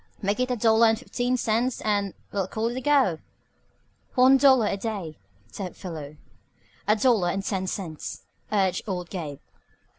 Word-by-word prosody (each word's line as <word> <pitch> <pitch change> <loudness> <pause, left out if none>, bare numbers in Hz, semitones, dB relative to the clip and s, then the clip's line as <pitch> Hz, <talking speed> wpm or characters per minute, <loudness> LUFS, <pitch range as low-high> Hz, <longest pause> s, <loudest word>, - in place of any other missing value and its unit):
"Make 200 +2 -1
it 255 0 +1
a 250 - +1
dollar 225 0 +4
an' 225 - +4
fifteen 245 +1 -2
cents 235 +2 0
and 205 -2 0 0.2
we'll 195 -2 -1
call 220 +3 -1
it 240 - -5
a - - -3
go." 265 - +3 1.0
"One 260 +2 +7
dollar 265 -4 +5
a 205 - 0
day," 195 -7 -5 0.3
said 185 -4 -6
Philo. 155 -5 -8 0.7
"A 210 - +5
dollar, 205 -6 +2
ten 195 -1 -2
cents," 170 -6 -5 0.3
urged 190 -3 +1
old 180 -3 -4
Gabe. 155 -7 -5
210 Hz, 155 wpm, -26 LUFS, 185-245 Hz, 1.0 s, One